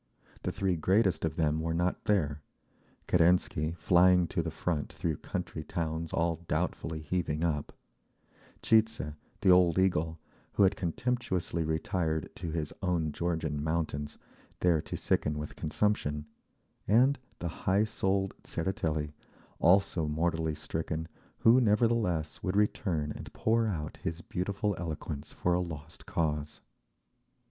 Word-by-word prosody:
The - - -2
three 95 -3 0
greatest 95 0 +2
of 80 -1 -2
them 80 -1 +1
were 80 +1 -1
not 90 +2 0
there: 75 -8 +1 0.7
Kerensky, 85 -2 +3
flying 90 +2 +5
to - - 0
the 85 - -3
front 80 -1 -2
through 80 -3 -2
country 80 - -5
towns 80 -1 -3
all 85 0 +1
doubtfully 80 -1 -2
heaving 80 -1 -1
up; 75 -4 -1 0.9
Tcheidze, 110 -8 +3 0.3
the 95 - +6
old 90 -2 +5
eagle, 85 -4 +2 0.4
who - - +4
had 95 - +4
contemptuously 90 -3 -1
retired 80 0 -1
to 85 -1 -4
his 80 -2 -3
own 85 -4 0
Georgian 80 -3 -2
mountains, 75 -2 -2 0.4
there 85 -3 +4
to - - -5
sicken 75 0 0
with 75 0 -5
consumption; 75 -4 0 0.6
and 130 +6 +4 0.2
the 85 - -3 0.2
high 100 +3 +4
souled 95 -3 0
Tseretelli, 80 -5 -2 0.5
also 90 -3 +4
mortally 80 0 0
stricken, 80 +1 -3 0.3
who, 120 +3 +6
nevertheless, 105 -7 +1
would 95 +1 -1
return 90 -7 +1
and - - -8
pour 115 +1 +2
out 75 -7 -3
his 85 +1 -4
beautiful 100 +4 -2
eloquence 75 -3 -5
for 90 - 0
a 90 - +2
lost 80 -1 -7
cause. 75 -2 -1
85 Hz, 130 wpm, -30 LUFS, 80-95 Hz, 0.9 s, the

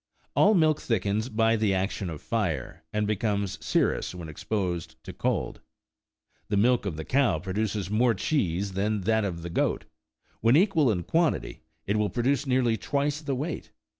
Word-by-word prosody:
All 210 +1 +5
milk 155 -3 +3
thickens 110 +1 0
by 115 0 +2
the 105 -3 +1
action 95 0 -2
of 80 -3 -7
fire, 90 - -2
and 105 0 0
becomes 105 -2 -1
serous - - 0
when 85 -3 -7
exposed 90 0 -3
to - - -8
cold. - - -2 0.9
The 105 - 0
milk 120 0 +3
of 85 - -3
the 80 - -5
cow 135 - +2
produces 100 +2 -2
more 115 +2 +3
cheese 100 - 0
than 100 +2 -1
that 110 +3 +2
of 85 -4 -3
the 85 - -5
goat: - - 0 0.5
when 115 +4 +4
equal 165 - +4
in 90 -4 -1
quantity, 165 - 0 0.2
it 100 +2 0
will 105 -1 +1
produce 135 +7 0
nearly 125 -3 +2
twice 145 +4 -1
the 140 -3 -2
weight. 150 +6 -4
105 Hz, 165 wpm, -27 LUFS, 95-125 Hz, 0.9 s, All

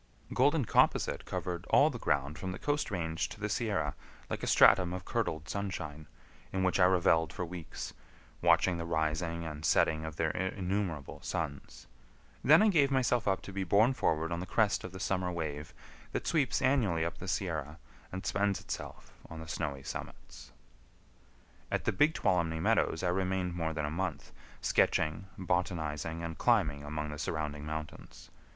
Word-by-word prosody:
Golden 140 +1 +3
composite - - +2
covered 85 -1 -4
all 150 +2 +5
the 120 - -6
ground 70 -2 0
from 95 -1 -3
the - - -6
Coast 145 0 -1
Range 80 -5 -2
to - - -10
the - - -1
Sierra - - 0 0.4
like - - -2
a - - -3
stratum 90 -2 +6
of 90 0 -5
curdled 80 0 -2
sunshine, 85 -5 -4 0.4
in 95 0 -1
which 95 +1 +2
I 90 - +7
reveled 85 -4 +3
for 90 - -4
weeks, 85 -2 -7 0.5
watching 90 -2 +4
the 85 - -3
rising 80 +1 -1
and 75 -1 -6
setting 80 0 +3
of 80 -2 -5
their 80 -1 0
innumerable 95 -4 -2
suns; 80 -5 -5 0.6
then 160 +8 +7
I 215 - +5
gave 145 -8 +4
myself 125 -4 +1
up 95 -1 +1
to 100 - -8
be 95 0 -1
borne 105 +7 +4
forward 80 -7 0
on 85 - -1
the 90 - -5
crest 105 -1 +2
of 95 - -6
the 95 - -8
summer 90 -1 0
wave 80 -2 -4 0.4
that - - -2
sweeps 140 -5 +1
annually 110 -12 +2
up 85 - -4
the 95 - -7
Sierra 80 -5 -2 0.3
and 95 +1 -6
spends 100 -1 +1
itself - - -7 0.2
on 80 - -8
the 80 - -8
snowy 70 -4 -3
summits. 60 0 -8 1.2
At - - -1
the - - +3
Big 150 +11 +3
Tuolumne 85 -3 +1
Meadows 80 +1 +2
I 90 - +2
remained 95 -1 0
more 80 -2 -1
than 75 -1 -2
a 75 - -3
month, 90 -1 -3 0.3
sketching, 80 +4 +1
botanizing, 85 -3 -2
and 80 -2 -5
climbing 70 -1 +2
among 75 +1 -4
the 75 - -7
surrounding 75 -2 -3
mountains. 80 0 -7
85 Hz, 170 wpm, -32 LUFS, 80-95 Hz, 1.2 s, I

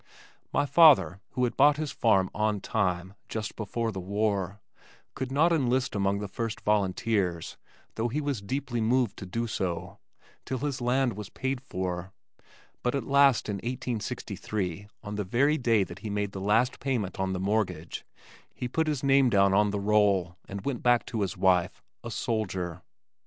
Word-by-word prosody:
My - - +2
father 140 - +6
who 125 - 0
had 120 - 0
bought 145 +1 +5
his 155 -1 -3
farm 95 -5 +2
"on 105 0 0
time," 95 -3 -1 0.2
just 110 -2 -4
before 115 +2 -2
the 95 - -5
war, 100 0 -1 0.5
could 130 0 -4
not 160 +5 +4
enlist 130 -3 +1
among 100 0 +1
the 105 0 -4
first 115 +2 -4
volunteers, 100 -3 0 0.4
though 115 +1 -1
he 130 +6 -2
was 140 -7 -2
deeply 125 +2 -3
moved 120 -1 +2
to 95 - -7
do 115 +6 -2
so, 95 -6 -3 0.4
till 130 - -3
his 140 0 -3
land 125 0 +2
was 105 0 -7
paid 130 -1 -3
for 90 -5 -4 0.7
but 125 +2 0
at 140 - -1
last 140 -3 +4
in 105 -2 -2
1863 105 -4 -4 0.2
on 105 0 -5
the 105 - -1
very 140 +10 +2
day 115 -5 +3
that 90 0 -9
he 105 - -6
made 100 -1 -1
the 95 - -6
last 110 +5 +2
payment 120 -10 -2
on 95 0 0
the 90 - -2
mortgage, 95 -5 -1 0.5
he 125 - -3
put 160 +6 0
his 150 -4 -1
name 135 -1 +5
down 100 -2 +4
on 105 +1 +4
the 100 0 -2
roll 100 -4 +2
and 100 0 -7
went 135 -4 -2
back 120 -1 +3
to 110 - -3
his 95 -4 -2
wife, 90 -2 +2 0.2
a - - -5
soldier. 90 -6 -2
105 Hz, 175 wpm, -28 LUFS, 95-125 Hz, 0.7 s, father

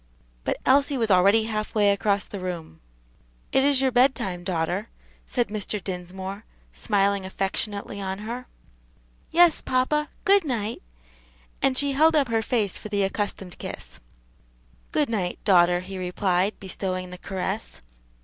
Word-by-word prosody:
But - - 0
Elsie 280 +1 +4
was 225 -4 +1
already 200 +4 +5
half 215 -1 -3
way 205 -2 +5
across 200 0 +1
the 200 - -7
room. 170 - -6 0.7
"It 265 - +3
is 280 -2 +3
your 265 -1 +2
bedtime, 245 -8 +2
daughter," 180 +4 -1 0.4
said 240 -4 0
Mr. 210 0 -2
Dinsmore, 190 +2 -6 0.3
smiling 200 -2 +1
affectionately 200 +2 -3
on 190 0 -3
her. 235 +4 -6 0.8
"Yes, 340 -1 +5
papa; 300 +4 +1 0.2
good 400 -1 +5
night," 230 -6 -2 0.8
and 265 -1 +2
she 285 0 +2
held 315 +4 +4
up 280 -5 +3
her 225 -1 +2
face 220 -4 0
for 215 - -8
the 205 -1 +1
accustomed 195 -2 -3
kiss. - - -8 0.9
"Good 300 -2 +2
night, 195 -6 -2
daughter," 175 -2 +5
he 190 +1 -7
replied, 185 +2 0
bestowing 185 -1 -4
the 180 - -9
caress. 195 +3 -4
205 Hz, 140 wpm, -25 LUFS, 190-250 Hz, 0.9 s, already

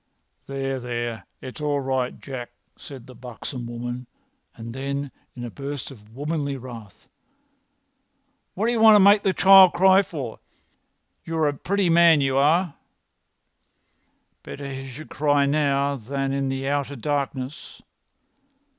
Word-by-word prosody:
"There, 135 -1 -3
there! 120 -5 -5
It's 130 +3 -9
all 145 -1 0
right, 130 -2 -2
Jack," 130 -3 -7 0.3
said 135 -4 -11
the 130 - -13
buxom 125 0 -8
woman, 120 +1 -6 0.5
and 115 0 -8
then, 140 +1 -4 0.2
in 120 - -7
a 120 - -6
burst 140 +1 -6
of 110 -3 -16
womanly 145 -1 -3
wrath, 115 -6 -11 1.5
"What 205 - -1
d'you 235 0 +1
want 220 -1 +8
to - - +7
make 200 +1 +6
the 195 - +1
child 190 -1 +7
cry 190 +2 +5
for? 140 - -7 0.8
You're 160 -2 0
a 145 - 0
pretty 190 +4 0
man, 165 -2 +6
you 135 -1 0
are!" 160 +4 +3 1.7
"Better 140 -1 -7
he 135 0 -7
should 150 +5 -11
cry 145 -1 +2
now 140 -1 +1
than 135 +3 -3
in 135 -1 -1
the 135 0 -3
outer 140 0 -1
darkness. 140 +1 -4
140 Hz, 135 wpm, -23 LUFS, 130-155 Hz, 1.7 s, want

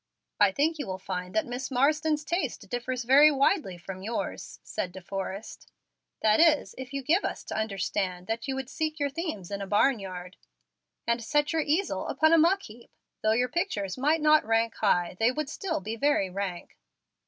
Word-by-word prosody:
"I 205 -2 +6
think 305 +8 0
you 285 - -4
will 185 -1 -3
find 185 0 -5
that 215 - +2
Miss 245 +2 -5
Marsden's 300 +3 +2
taste 310 - -2
differs 245 +1 -2
very 275 +5 +7
widely 275 - +1
from 185 +2 -8
yours," 225 +4 -4
said 180 - -4
De 190 - -9
Forrest; 195 +3 -6 0.5
"that 215 -1 +4
is, 320 -2 +4
if 260 0 -8
you 275 -1 -4
give 335 +9 +2
us - - -3
to - - -6
understand 195 -3 -2
that 225 +5 -3
you 270 - -1
would 265 0 -4
seek 310 -1 -3
your 285 -1 0
themes 275 - -5
in 200 0 -3
a 195 - -4
barn 220 +5 +3
yard, 180 -2 -8 0.7
and 235 0 0
set 295 +6 +1
your 325 - +2
easel 315 +6 0
upon 315 +1 +3
a - - +7
muck 370 +5 +3
heap. 230 +2 -13 0.3
Though 215 0 +3
your 250 +2 +1
pictures 210 - -2
might 300 +5 +1
not 305 0 +5
rank 225 +1 +1
high 180 -4 +1
they 225 +2 +4
would 300 +2 -3
still 330 0 -2
be 215 +4 -5
very 230 -7 +1
rank." 185 -2 -5
245 Hz, 195 wpm, -28 LUFS, 195-300 Hz, 0.7 s, very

